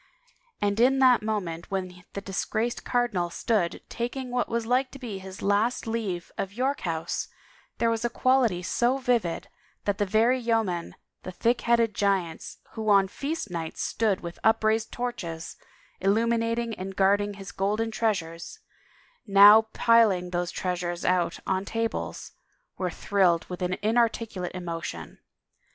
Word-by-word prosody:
And 205 +1 +1
in 260 +3 +5
that 255 -3 +5
moment 185 -6 -3
when 185 -2 -4
the 200 - -4
disgraced 220 +4 -2
cardinal 215 -8 0
stood 175 0 -1
taking 245 +2 -4
what 245 0 0
was 230 0 -1
like 255 +3 +1
to - - -8
be 230 -7 -6
his 190 0 -9
last 205 +5 +1
leave 215 -7 -3
of 195 0 -3
York 265 +5 0
House 165 -2 -2 0.5
there 230 - +2
was 225 0 -2
a 240 - +1
quality 235 -7 +2
so 245 +7 +1
vivid 240 -10 0 0.4
that 205 0 0
the 205 - +2
very 230 +6 +3
yeomen, 225 -8 -1 0.3
the 185 - -7
thick 235 +6 +1
headed 235 -2 +2
giants 195 -5 -1
who 220 -1 -3
on 195 -2 +5
feast 285 - -4
nights 165 -2 -4
stood 210 -4 0
with 170 -1 -7
upraised 220 0 +2
torches, 180 -10 -5 0.4
illuminating 230 +3 +1
and 190 +1 -5
guarding 205 +1 +2
his 195 -1 -9
golden 210 +4 -1
treasures, 175 -7 -2 0.7
now 205 +2 +8
piling 210 -7 +3
those 175 -1 -1
treasures 175 -1 -3
out 180 -2 +1
on 190 0 0
tables, 225 +2 -3 0.4
were 185 -1 -2
thrilled 180 -3 +1
with 180 0 -6
an 180 0 -1
inarticulate 220 -5 0
emotion. 165 - -6
205 Hz, 145 wpm, -27 LUFS, 180-230 Hz, 0.7 s, now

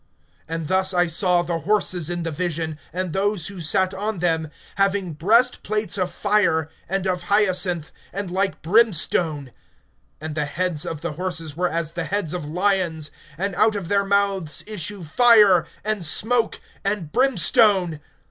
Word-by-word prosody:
(17)And 165 0 -3
thus 190 +3 +1
I 175 0 +4
saw 175 +1 +1
the 170 -1 -2
horses 185 -4 0
in 175 -1 -3
the 165 - -3
vision, 160 -1 -3
and 180 -2 -3
those 200 -3 0
who 195 -3 -8
sat 185 +4 +1
on 210 +1 -3
them, 165 -2 0 0.3
having 195 -3 +1
breastplates 215 +4 +2
of 185 -2 -1
fire, 200 -7 +1 0.2
and 195 0 -1
of 180 -1 -1
hyacinth, 185 -5 +1 0.2
and 195 -2 -5
like 190 +1 -1
brimstone; 165 - +2 0.7
and 155 0 -6
the 150 -1 -1
heads 160 +1 -2
of 155 -2 -5
the 170 -1 -3
horses 165 -2 -5
were 180 +2 0
as 165 -1 -3
the 170 0 -4
heads 200 -5 -2
of 175 -4 -4
lions, 175 -3 0 0.3
and 195 +2 -2
out 215 +4 +3
of 195 -5 -5
their 200 0 +2
mouths 195 -6 0
issue 205 -2 -5
fire, 205 -2 +5 0.2
and 215 -3 -1
smoke, 225 +8 +2 0.2
and 195 -6 -2
brimstone. 205 - +3
180 Hz, 155 wpm, -22 LUFS, 165-200 Hz, 0.7 s, fire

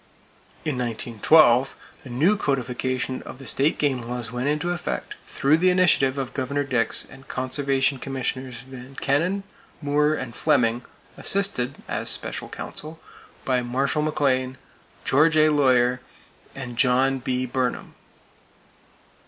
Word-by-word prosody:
In 145 -5 -1
1912 120 +3 +3 0.3
a - - -9
new 155 +12 +3
codification 130 - -2
of - - -10
the 135 - -12
state 140 +4 +2
game 135 -4 0
laws 120 0 -5
went 125 +2 -2
into 150 +4 0
effect, 175 0 -4
through 145 +3 +2
the 185 +2 +3
initiative 170 -7 +3
of 135 -2 -4
Governor 140 +2 -1
Dix 125 -4 +1
and 135 - -15
Conservation 135 +1 0
Commissioners 130 -2 -4
Van 130 0 -12
Kennen, 170 +10 0 0.4
Moore 150 +1 +2
and 130 -5 -6
Fleming, 125 -6 +2 0.4
assisted 165 -10 +1
(as - - -2
special - - -3
counsel) 155 +2 -5 0.5
by 130 -1 +1
Marshall 135 +5 0
McLean, 130 -4 0 0.5
George 155 +4 +4
A. 155 0 +5
Lawyer 125 -4 +3 0.5
and 125 -3 -7
John 130 +1 +3
B. 130 0 -1
Burnham. 130 0 -2
135 Hz, 130 wpm, -24 LUFS, 125-150 Hz, 0.5 s, A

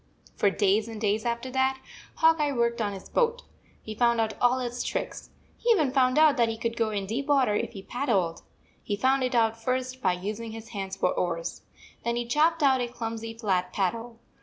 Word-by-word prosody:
For 200 - +3
days 205 +2 +2
and 225 -2 -7
days 215 +1 0
after 235 +2 -2
that, 265 0 +1 0.4
Hawk 325 0 +4
Eye 295 -1 +1
worked 235 -1 0
on 205 -2 -1
his 190 - -9
boat. 485 0 +1 0.4
He 215 - -6
found 235 +1 +2
out 220 -1 0
all 245 +1 +4
its 245 -1 -3
tricks. - - -4 0.3
He 480 - -1
even 315 - +4
found 255 -1 +3
out 305 -2 +6
that 235 -2 +3
he 225 - -3
could 230 0 -2
go 230 -2 +1
in 205 -2 -2
deep 245 +8 -3
water 270 -7 +3
if 210 - -2
he 195 - -8
paddled. 200 -10 -1 0.4
He 205 - -2
found 265 +5 +2
it 255 0 0
out 225 -1 +2
first 255 +1 -2
by 185 -5 +2
using 210 +5 -5
his 225 +1 -9
hands 195 -4 -5
for 180 - +2
oars. 165 -2 -2 0.4
Then 235 0 0
he 240 0 -2
chopped 310 +6 +2
out 265 -2 +4
a 245 - -1
clumsy 225 -1 -5
flat 185 -5 -1
paddle. 225 +5 -2
235 Hz, 210 wpm, -27 LUFS, 210-260 Hz, 0.4 s, out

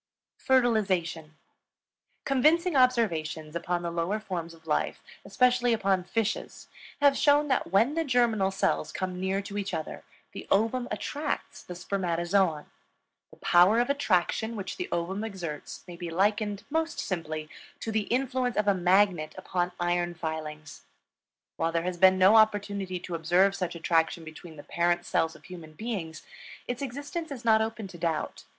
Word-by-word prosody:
FERTILIZATION. 190 - +1 0.9
Convincing 310 +6 +3
observations 170 - +1
upon 175 +1 -2
the 170 - -2
lower 170 +5 -1
forms 170 -5 -5
of 160 0 -22
life, 155 - -1 0.2
especially 245 -1 +2
upon 195 -4 +1
fishes, 220 +3 -3 0.3
have 285 -1 +5
shown 290 +1 +3
that 260 - 0
when 225 +9 +3
the 330 +1 0
germinal 240 -8 +2
cells 195 - 0
come 185 -1 -4
near 190 +1 -1
to 205 +1 -5
each 200 0 -3
other, 155 - -6 0.3
the - - -9
ovum 230 +5 +1
attracts 290 +8 -4
the 180 - -9
spermatozoon. 175 -2 0 0.6
The - - -17
power 180 +6 +5
of 245 +3 +2
attraction 220 -3 0
which 190 -3 -5
the 360 - -4
ovum 185 +5 -2
exerts 175 -9 -6
may 175 - -8
be 175 -1 -5
likened, 205 +3 0
most 320 +1 -1
simply, 155 -4 -4 0.3
to 225 - -3
the 215 -1 -1
influence 255 -1 0
of 210 -1 +1
a 200 - +5
magnet 180 -3 +2
upon 180 -1 -2
iron 175 0 0
filings. 155 -2 -6 0.8
While 165 0 0
there 165 0 0
has 180 0 -3
been 190 +1 +6
no 190 +4 +6
opportunity 200 -4 +1
to 180 - -7
observe 175 +4 +3
such 180 -3 -3
attraction 165 0 +1
between 160 +1 -11
the 145 - -11
parent 175 0 0
cells 160 0 0
of - - -16
human 170 -4 -11
beings, 170 -5 -5 0.4
its 245 +1 -4
existence 285 +5 -5
is 260 -4 -8
not 220 -1 +5
open 220 -2 -3
to 175 - -11
doubt. 160 -2 -2
190 Hz, 155 wpm, -28 LUFS, 170-230 Hz, 0.9 s, been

